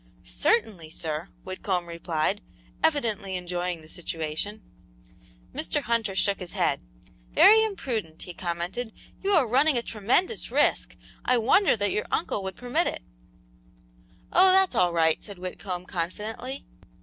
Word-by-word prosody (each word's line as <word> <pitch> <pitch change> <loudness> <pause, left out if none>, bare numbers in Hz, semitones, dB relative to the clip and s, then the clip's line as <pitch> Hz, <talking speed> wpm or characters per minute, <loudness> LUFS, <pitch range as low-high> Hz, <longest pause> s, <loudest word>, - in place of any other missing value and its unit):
"Certainly, 205 - 0
sir," 155 0 -3
Whitcomb 185 -1 -2
replied, 170 +3 -1 0.4
evidently 225 -11 +1
enjoying 180 -2 -3
the - - -13
situation. 165 +5 -4 0.9
Mr. 225 - -1
Hunter 225 -4 0
shook 200 +1 +2
his 180 -2 -7
head. - - +1 0.5
"Very 440 +1 +8
imprudent!" 235 - -3
he 180 - -7
commented. 175 +7 -3 0.3
"You 395 +1 +1
are 315 -9 +4
running 270 +4 +4
a 235 - 0
tremendous 240 - 0
risk. - - +1 0.3
I 250 - +3
wonder 265 - +4
that 205 -1 0
your 210 - -1
uncle 205 - -1
would 190 -1 -5
permit 250 +8 0
it!" - - -4 1.3
"Oh, 370 +1 +7
that's 380 0 +5
all 180 -1 +3
right," 160 -1 +2
said 200 -3 -9
Whitcomb, 180 0 -5
confidently. 210 +10 -4
200 Hz, 135 wpm, -26 LUFS, 175-250 Hz, 1.3 s, Very